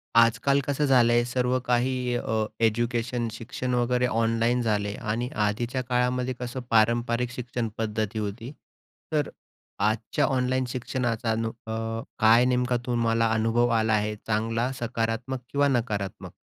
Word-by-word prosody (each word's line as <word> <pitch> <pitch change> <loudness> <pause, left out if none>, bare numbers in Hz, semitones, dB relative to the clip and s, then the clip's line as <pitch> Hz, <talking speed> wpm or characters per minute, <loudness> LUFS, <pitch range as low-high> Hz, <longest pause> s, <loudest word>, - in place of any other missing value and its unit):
आजकाल 115 +4 +4
कसं 145 +1 +1
झालंय 120 -3 +4
सर्व 125 +1 0
काही 125 0 +1
अ, 110 -2 0 0.2
एज्युकेशन 120 +1 0
शिक्षण 120 +3 -4
वगैरे 125 +1 +2
ऑनलाईन 115 +1 +1
झालंय. 105 -3 0
आणि 115 +3 -2
आधीच्या 115 +5 0
काळामध्ये 125 +1 0
कसं 125 +1 -4
पारंपरिक 120 +2 +2
शिक्षणपद्धती 110 -3 -3
होती. 110 +5 -5 0.6
तर 150 -2 +1
अ, - - -14 0.5
आजच्या 110 +6 +1
ऑनलाईन 130 -1 +1
शिक्षणाचा 120 -2 -2
नु 115 0 -1 0.2
अ, - - -4 0.5
काय 115 +2 +6
नेमका 125 -1 +1
तुम्हाला 115 -2 +1
अनुभव 115 +2 +2
आला 110 0 +1
आहे 105 0 0
चांगला 115 +3 0
सकारात्मक 115 +2 -2
किंवा 145 0 +3
नकारात्मक? 110 -7 -2
120 Hz, 130 wpm, -26 LUFS, 115-125 Hz, 0.6 s, काय